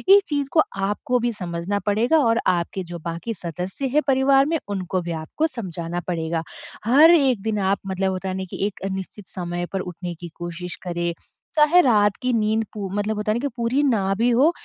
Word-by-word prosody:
इस 405 Hz, -, +5 dB
चीज़ 285 Hz, -2 st, -1 dB
को 315 Hz, -, +5 dB, 0.3 s
आपको 245 Hz, +4 st, 0 dB
भी 240 Hz, 0 st, 0 dB
समझना 180 Hz, 0 st, -3 dB
पड़ेगा 220 Hz, +9 st, +3 dB
और 230 Hz, 0 st, +3 dB
आपके 180 Hz, +1 st, 0 dB
जो 170 Hz, -, -5 dB
बाकी 170 Hz, +7 st, -3 dB
सदस्य 180 Hz, -, -4 dB
हैं 300 Hz, -, +5 dB
परिवार 270 Hz, 0 st, +4 dB
में 325 Hz, +3 st, +1 dB
उनको 185 Hz, -2 st, -2 dB
भी 170 Hz, 0 st, -5 dB
आपको 310 Hz, -, -1 dB
समझाना 175 Hz, -, -5 dB
पड़ेगा। 165 Hz, -2 st, -1 dB, 0.4 s
हर 290 Hz, +8 st, +7 dB
1 270 Hz, -, +4 dB
दिन 215 Hz, 0 st, -1 dB
आप 195 Hz, 0 st, +2 dB
मतलब 190 Hz, 0 st, 0 dB
होता 190 Hz, +1 st, -3 dB
है 185 Hz, -, -3 dB
ना 190 Hz, -, -3 dB
कि -, -, -2 dB
एक 200 Hz, -1 st, -7 dB
निश्चित 190 Hz, +1 st, -6 dB
समय 175 Hz, -1 st, -4 dB
पर 195 Hz, -, 0 dB
उठने 180 Hz, -1 st, -6 dB
की 175 Hz, +1 st, -9 dB
कोशिश 175 Hz, +1 st, -6 dB
करें। 175 Hz, -1 st, -2 dB, 0.4 s
चाहे 305 Hz, +3 st, +6 dB
रात 205 Hz, -, +3 dB
की 255 Hz, -, +1 dB
नींद 220 Hz, 0 st, +2 dB
पू 200 Hz, -3 st, -4 dB
मतलब 210 Hz, +1 st, 0 dB
होता 210 Hz, 0 st, 0 dB
है -, -, +1 dB
ना -, -, -2 dB
कि 285 Hz, -, -1 dB
पूरी 235 Hz, +4 st, +1 dB
ना 205 Hz, -8 st, +2 dB
भी 235 Hz, +3 st, +3 dB
हो, 260 Hz, +7 st, +4 dB
205 Hz, 210 wpm, -23 LUFS, 180-245 Hz, 0.4 s, हर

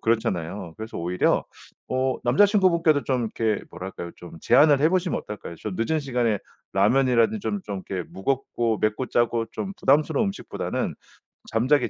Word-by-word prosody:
그렇잖아요. 95 Hz, -6 st, -1 dB
그래서 110 Hz, +1 st, -7 dB
오히려 90 Hz, +2 st, +1 dB, 0.4 s
어 130 Hz, 0 st, +1 dB
남자친구분께도 170 Hz, -, +4 dB
좀 125 Hz, -4 st, 0 dB
이렇게 110 Hz, -3 st, 0 dB
뭐랄까요? 90 Hz, -1 st, -7 dB
좀 85 Hz, -, -11 dB
제안을 145 Hz, -2 st, +5 dB
해 155 Hz, -, +5 dB
보시면 185 Hz, -1 st, +1 dB
어떨까요? 105 Hz, -5 st, -8 dB
좀 105 Hz, +1 st, -5 dB
늦은 155 Hz, +8 st, 0 dB
시간에 120 Hz, -6 st, 0 dB, 0.4 s
라면이라든지 120 Hz, -, +3 dB
좀 205 Hz, 0 st, -2 dB
좀 100 Hz, -2 st, -5 dB
이렇게 90 Hz, -3 st, -4 dB
무겁고 120 Hz, 0 st, -1 dB
맵고 110 Hz, +4 st, 0 dB
짜고 120 Hz, -1 st, +1 dB
좀 195 Hz, -, -4 dB
부담스러운 150 Hz, +10 st, +3 dB
음식보다는 195 Hz, -, -3 dB, 0.6 s
잠자기 130 Hz, +6 st, +2 dB
120 Hz, 390 characters per minute, -25 LUFS, 105-145 Hz, 0.6 s, 제안을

